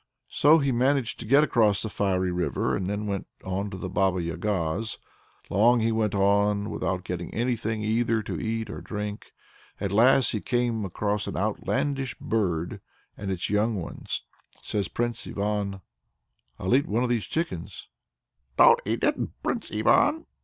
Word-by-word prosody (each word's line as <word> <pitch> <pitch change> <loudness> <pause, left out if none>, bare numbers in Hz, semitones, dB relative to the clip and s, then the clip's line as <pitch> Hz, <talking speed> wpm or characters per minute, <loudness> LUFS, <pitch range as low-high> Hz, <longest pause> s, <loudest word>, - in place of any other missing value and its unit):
So 150 +3 +6
he 140 -3 +1
managed 130 0 +1
to 115 - -7
get 140 +5 +6
across 110 -8 +3
the - - -2
fiery 95 -3 0
river, 90 0 0
and 95 0 -2
then 105 +1 -2
went 100 -2 -3 0.2
on 95 +2 -2
to 95 - -7
the 95 - -5
Baba 95 0 +1
Yaga's. 90 +3 -2 0.5
Long 115 +5 +4 0.2
went 110 -2 0
he 100 - 0
on 100 +1 +2
without 90 -1 -2
getting 85 -1 -5
anything 115 -2 -1
either 110 0 +1
to - - -4
eat 110 -1 -2
or - - -6
to - - -8
drink. 105 0 -5 0.5
At 100 -1 -2
last 125 +5 +5
he 105 - -2
came 120 -3 0
across 105 +3 -2
an - - -4
outlandish 135 +6 -1
bird 90 -7 -1 0.3
and 100 - -5
its 95 0 -2
young 105 +2 +2
ones. 90 -4 -5 0.4
Says 100 -4 -1
Prince 120 +2 -3
Ivan: 100 -1 -2 0.8
"I'll 95 +7 +1
eat 140 - +2
one 115 +4 +1
of 125 - 0
these 115 -3 0
chickens." 165 +2 -4 0.7
"Don't 475 0 +7
eat - - -1
it, - - +3 0.3
Prince - - -2
Ivan!" 320 +2 +3
105 Hz, 165 wpm, -26 LUFS, 95-120 Hz, 0.8 s, Don't